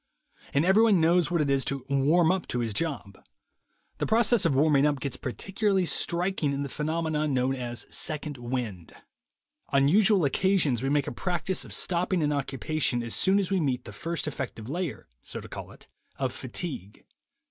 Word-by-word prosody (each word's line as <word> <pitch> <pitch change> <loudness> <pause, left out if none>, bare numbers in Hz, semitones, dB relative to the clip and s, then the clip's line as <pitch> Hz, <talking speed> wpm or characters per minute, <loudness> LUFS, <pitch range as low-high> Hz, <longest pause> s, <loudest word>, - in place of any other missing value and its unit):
And 145 +4 +3
everybody 210 +3 +5
knows 170 +1 +3
what 170 -2 +1
it 145 - 0
is 135 -1 +2
to 140 -2 -3
'warm 150 +5 +3
up' 185 -1 -2
to 125 - -2
his 115 -3 -2
job. 135 - -3 0.8
The - - -1
process 225 -2 +3
of 150 -5 +2
warming 145 0 +4
up 145 -2 0
gets 140 0 -4
particularly 195 - -1
striking 170 -3 0
in 140 +1 -2
the 140 - -5
phenomenon 155 -1 -1
known 130 +1 +1
as 120 -2 -5
'second 150 -3 -2
wind.' 120 -9 -4 0.8
On 140 0 +3
usual 195 +1 +4
occasions 155 - +2
we 135 - -1
make 145 -1 +2
a - - -4
practice 180 +6 -1
of - - -12
stopping 180 -1 0
an 150 0 +1
occupation 135 -2 -1
as 115 - -3
soon 190 +1 +3
as 195 -2 0
we 190 - +2
meet 130 -6 -1
the - - -9
first 165 -1 -3
effective 115 -6 -5
layer 170 +1 -4
(so - - -6
to - - -10
call - - -8
it) - - -16 0.3
of 130 -2 -2
fatigue. 130 - -6
150 Hz, 180 wpm, -27 LUFS, 135-180 Hz, 0.8 s, everybody